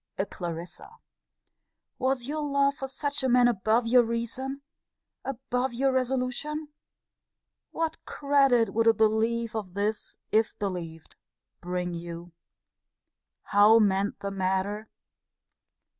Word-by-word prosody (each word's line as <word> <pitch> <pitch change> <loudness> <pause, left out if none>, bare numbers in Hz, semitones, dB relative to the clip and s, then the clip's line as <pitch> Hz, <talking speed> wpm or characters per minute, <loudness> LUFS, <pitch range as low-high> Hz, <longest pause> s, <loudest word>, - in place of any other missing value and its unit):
A 195 - 0
Clarissa! 175 - -7 1.0
Was 260 -1 0
your 300 +3 -3
love 280 -1 +2
for 270 -1 -6
such 285 +2 -3
a 260 - +1
man 245 0 +5
above 225 +1 +2
your 245 +2 +6
reason? 240 +4 -3 0.6
Above 255 -1 -2
your 270 +2 +2
resolution? 260 +4 -1 1.0
What 325 -1 -3
credit 275 -5 +2
would 230 +1 +2
a 225 - +6
belief 225 +2 +1
of 195 -4 -5
this, 205 +2 -2
if 220 +1 +2
believed, 170 -5 -5 0.4
bring 180 0 -3
you? 170 0 -7 1.1
How 205 +2 +6
mend 200 -2 +2
the 200 - -3
matter? 195 +3 -1
230 Hz, 115 wpm, -27 LUFS, 200-265 Hz, 1.1 s, your